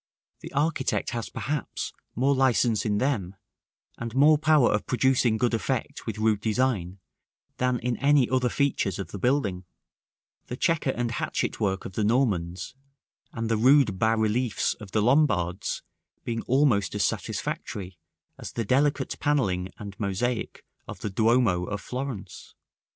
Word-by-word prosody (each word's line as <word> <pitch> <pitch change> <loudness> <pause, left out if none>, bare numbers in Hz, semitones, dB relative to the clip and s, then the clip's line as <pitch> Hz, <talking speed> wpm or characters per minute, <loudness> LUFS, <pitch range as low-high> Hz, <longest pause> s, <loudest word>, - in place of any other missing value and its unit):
The - - -9
architect 145 -2 0
has 115 -2 -4
perhaps 145 -1 -4 0.2
more 135 +4 +2
license 120 -5 +2
in 105 -1 +1
them, 105 -7 -1 0.6
and 115 0 -5
more 150 +2 +6
power 155 -4 +4
of 105 - -1
producing 125 -2 +2
good 120 +1 +1
effect 115 - -2
with - - -3
rude 110 -1 +1
design 110 -5 0 0.6
than 125 0 +1
in 120 -1 -2
any 140 -2 +4
other 130 -1 +1
features 130 -9 0
of 95 -4 -6
the 100 - -6
building; 105 -7 0 0.8
the 125 - -5
chequer 165 -2 +1
and 120 -2 -1
hatchet - - -2
work 95 -2 -1
of 95 - -7
the 110 - -1
Normans 100 -7 0 0.6
and 115 -1 -3
the 115 -1 +1
rude 125 -4 +4
bas 110 0 +3
reliefs 110 0 +1
of 105 - -12
the 105 +1 +1
Lombards 105 - +1 0.4
being 115 -1 -3
almost 120 - +2
as - - +2
satisfactory 95 -4 -4 0.4
as - - -7
the 115 - -2
delicate 140 +3 +1
panelling 100 -12 0
and 100 -1 -9
mosaic 110 +4 -2 0.2
of - - -8
the 105 - -3
Duomo 110 -4 +2
of 105 +2 -4
Florence. 125 -5 -6
115 Hz, 150 wpm, -26 LUFS, 100-130 Hz, 0.8 s, more